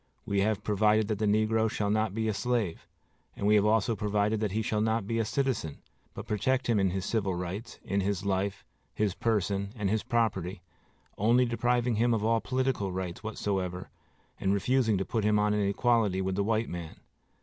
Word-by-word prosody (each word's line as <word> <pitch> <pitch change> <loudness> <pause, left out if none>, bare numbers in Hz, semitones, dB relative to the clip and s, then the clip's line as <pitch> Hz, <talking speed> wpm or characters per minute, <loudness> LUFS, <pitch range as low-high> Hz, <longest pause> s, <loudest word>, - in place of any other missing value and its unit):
We 100 -1 0
have 105 0 0
provided 105 +1 +2
that 105 -2 -1
the 110 - +1
negro 110 +1 +2
shall 105 -1 -1
not 110 -1 0
be 110 0 -1
a 110 - +1
slave; 110 -4 -2 0.5
and - - -4
we 105 - +4
have 105 0 +4
also 110 +1 +2
provided 105 +1 0
that 105 -2 -1
he 110 +1 0
shall 105 0 0
not 110 -1 0
be 115 +2 -1
a 115 - +1
citizen, 115 - -1 0.4
but - - -6
protect 130 +5 0
him 115 -3 +2
in 95 -1 +2
his 95 0 -3
civil 100 -5 0
rights, 90 +6 -5
in 100 +1 0
his 100 0 -2
life, 100 0 -1 0.3
his 105 -3 0
person, 100 -2 -1
and 100 -4 -1
his 110 0 +1
property, 95 -6 -1 0.6
only 120 +5 +4
depriving 120 0 +1
him 120 +1 +3
of 110 -1 -1
all 115 0 +2
political 130 -5 -1
rights 90 -1 -4
whatsoever 95 -4 -3 0.5
and 95 +1 +1
refusing 115 0 +2
to 95 - -1
put 110 -2 -1
him 105 0 +3
on 105 0 +2
an 105 - +1
equality 105 -1 +2
with 95 0 -1
the 100 +2 0
white 110 +2 0
man. 85 -2 -7
105 Hz, 200 wpm, -29 LUFS, 100-115 Hz, 0.6 s, we